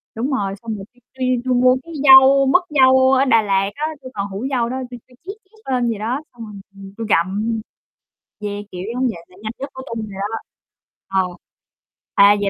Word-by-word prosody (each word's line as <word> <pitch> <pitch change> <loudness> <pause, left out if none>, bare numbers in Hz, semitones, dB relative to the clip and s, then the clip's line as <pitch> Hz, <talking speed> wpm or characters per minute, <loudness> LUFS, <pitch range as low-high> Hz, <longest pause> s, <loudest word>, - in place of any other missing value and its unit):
đúng 245 +6 -2
rồi, 200 -7 -1
xong 225 -2 -4
rồi 195 -2 -8
tui 245 - -28 0.2
tui 260 - -1 0.2
tui 255 - +1
mua 255 +1 +5
cái 335 - -11
dâu 270 0 +8
mứt 315 +8 +4
dâu 260 -2 +5
ở 265 +1 +4
Đà 230 -4 +4
Lạt 195 -1 +1
á, 300 - -2 0.2
tui 255 -1 -10
còn 200 -1 -3
hủ 200 +5 -6
dâu 240 -3 0
đó, 260 - -3
tui 245 - -8
tui 250 - -21
trét 390 - -5
trét 435 -6 -11
lên 245 -2 +1
vậy 220 -3 -3
đó, 235 +6 -2
xong 235 -2 -9
rồi, 210 - -11 0.2
ừm, 195 0 -11
tui 225 -1 -4
gặm. 205 +6 +1 0.8
Yeah, 205 -1 -5
kiểu 180 - -6
giống 250 +2 -2
vậy, 170 -8 -5
là 180 - -21
nhanh 220 0 -4
nhất 275 +2 -5
của 260 - -8
tui 225 - -4
rồi 200 -3 -8
đó. 210 +3 -2 0.7
Ờ 190 -1 +1 0.9
à, 200 +1 +7
vậy 200 - +1
230 Hz, 225 wpm, -20 LUFS, 205-260 Hz, 0.9 s, dâu